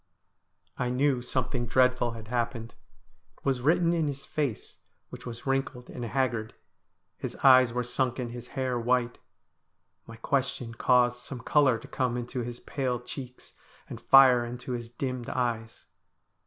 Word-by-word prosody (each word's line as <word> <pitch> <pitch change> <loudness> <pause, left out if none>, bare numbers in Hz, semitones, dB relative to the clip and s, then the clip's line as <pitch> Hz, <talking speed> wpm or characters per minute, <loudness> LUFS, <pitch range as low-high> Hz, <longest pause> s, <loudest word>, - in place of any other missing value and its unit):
I 125 - 0
knew 130 0 +1
something 125 -1 -1
dreadful 125 -1 +2
had 110 -1 -10
happened. 115 -1 -2 0.6
It - - -27
was 130 -2 +1
written 170 +5 +3
in 165 -3 +1
his 140 -1 -5
face, 140 -8 -3 0.3
which - - -9
was 115 -1 -8
wrinkled 135 -2 -2
and 120 - -6
haggard. 115 -2 -1 0.6
His 130 -3 -5
eyes 130 -3 +7
were 125 +1 -1
sunken, 125 0 -2
his 120 0 -8
hair 130 -2 0
white. 120 0 0 0.9
My 115 - -10
question 125 -1 -2
caused 125 0 +3
some 125 0 -8
colour 135 -1 +3
to - - -12
come 125 -2 -1
into 120 +1 -4
his 120 0 -5
pale 130 -4 -2
cheeks, 125 +1 -9 0.3
and - - -8
fire 130 -3 +7
into 125 +2 -6
his 120 -1 -4
dimmed 125 0 -4
eyes. 115 -2 -3
125 Hz, 150 wpm, -28 LUFS, 120-130 Hz, 0.9 s, eyes